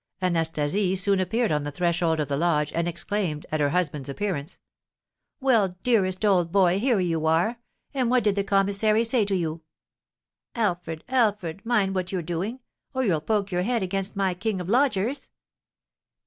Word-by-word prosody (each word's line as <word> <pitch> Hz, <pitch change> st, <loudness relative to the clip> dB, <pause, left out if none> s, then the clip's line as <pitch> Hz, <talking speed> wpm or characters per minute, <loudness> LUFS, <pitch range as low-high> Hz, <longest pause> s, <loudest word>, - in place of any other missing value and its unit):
Anastasie 175 Hz, +2 st, 0 dB
soon 195 Hz, +1 st, +3 dB
appeared 220 Hz, +5 st, 0 dB
on 150 Hz, -1 st, +1 dB
the 145 Hz, -, -4 dB
threshold 170 Hz, 0 st, 0 dB
of 150 Hz, -, -1 dB
the 140 Hz, -, -1 dB
lodge, 150 Hz, -1 st, +1 dB
and 170 Hz, 0 st, 0 dB
exclaimed, 175 Hz, -2 st, -3 dB
at 155 Hz, -, 0 dB
her 145 Hz, -1 st, +2 dB
husband's 150 Hz, -5 st, -1 dB
appearance: 155 Hz, -2 st, -3 dB, 0.8 s
"Well, 220 Hz, -9 st, +2 dB
dearest 200 Hz, -5 st, +1 dB
old 180 Hz, -5 st, +3 dB
boy, 190 Hz, -1 st, +3 dB
here 240 Hz, -2 st, +2 dB
you 165 Hz, -3 st, 0 dB
are! 175 Hz, +9 st, +1 dB, 0.3 s
And 255 Hz, -4 st, 0 dB
what 250 Hz, -1 st, +3 dB
did 205 Hz, -1 st, +3 dB
the 200 Hz, -, 0 dB
commissary 200 Hz, +3 st, +2 dB
say 230 Hz, -2 st, +1 dB
to 200 Hz, -1 st, 0 dB
you? 165 Hz, -2 st, -2 dB, 0.9 s
Alfred, 175 Hz, -8 st, -2 dB
Alfred, 210 Hz, -8 st, 0 dB
mind 215 Hz, -5 st, +1 dB
what 185 Hz, -1 st, -2 dB
you're 185 Hz, -3 st, -2 dB
doing, 185 Hz, +10 st, -4 dB, 0.3 s
or 260 Hz, -, +1 dB
you'll 175 Hz, -9 st, +1 dB
poke 200 Hz, +2 st, -1 dB
your 180 Hz, 0 st, 0 dB
head 230 Hz, +2 st, 0 dB
against 195 Hz, +2 st, -3 dB
my 195 Hz, -2 st, +1 dB
king 200 Hz, +2 st, -2 dB
of 180 Hz, -, -5 dB
lodgers. 250 Hz, +1 st, +1 dB
190 Hz, 170 wpm, -25 LUFS, 170-215 Hz, 0.9 s, soon